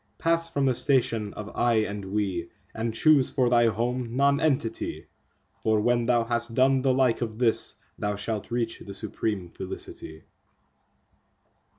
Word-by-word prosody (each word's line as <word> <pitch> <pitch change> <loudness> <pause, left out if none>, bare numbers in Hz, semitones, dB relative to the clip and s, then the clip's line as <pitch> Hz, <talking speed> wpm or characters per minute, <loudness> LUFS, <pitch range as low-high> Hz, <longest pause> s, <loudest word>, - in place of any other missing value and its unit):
Pass 165 0 +1
from 140 -4 0
the 130 - +3
station 115 -6 +1
of 105 0 -8
"I" 120 -1 +2
and 105 -1 -4
"We," 95 -4 -2 0.2
and 115 +1 -2
choose 140 +4 +4
for 125 -3 +1
thy 120 -1 +5
home 120 +2 -2
Nonentity, 140 -4 +1 0.6
For 110 -1 +2
when 120 +1 +1
thou 120 -1 +3
has 120 0 +1
done 130 +3 +3
the 135 0 +2
like 130 -2 +2
of 110 -2 -3
this, 115 -2 +1 0.2
thou 105 0 -1
shalt 105 +1 -4
reach 115 -1 -2
the 100 - -9
supreme 105 -3 -3
Felicity. 80 -3 -8
115 Hz, 150 wpm, -26 LUFS, 105-130 Hz, 0.6 s, thy